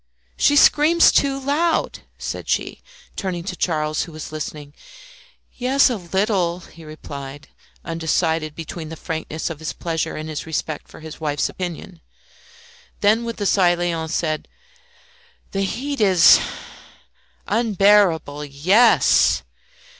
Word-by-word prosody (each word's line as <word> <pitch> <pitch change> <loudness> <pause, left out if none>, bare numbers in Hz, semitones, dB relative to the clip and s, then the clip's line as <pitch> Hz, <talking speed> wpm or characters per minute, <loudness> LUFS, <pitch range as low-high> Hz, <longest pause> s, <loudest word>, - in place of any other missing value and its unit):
"She 290 - +3
screams 310 +4 +5
too 275 -1 +1
loud," 300 +5 0 0.2
said - - -6
she, - - -2 0.3
turning 180 -4 -4
to 180 0 -5
Charles, 155 -3 -1
who 170 - -12
was 155 -1 -8
listening. 150 -1 -7 0.8
"Yes 260 +2 +2
a - - -1
little," 185 -2 -1
he 165 -1 -15
replied, 145 -2 -9 0.4
undecided 160 -1 -1
between 160 0 -7
the 165 - -7
frankness 160 0 -5
of 155 - -8
his 160 - -5
pleasure 165 -1 -3
and 155 0 -6
his 155 0 -6
respect 155 -1 -4
for - - -14
his 160 0 -10
wife's 145 -2 -1
opinion. 175 -1 -7 1.0
Then 220 +3 +3
with 230 -1 -5
a - - 0
sigh 180 -3 +3
Léon 170 -2 -2
said 155 -1 -2 1.0
"The 195 - -2
heat 265 +7 -3
is 185 -5 +7 0.5
" - - -34
"Unbearable! 200 -9 +2
Yes!" 185 - +3
170 Hz, 130 wpm, -21 LUFS, 155-205 Hz, 1.0 s, is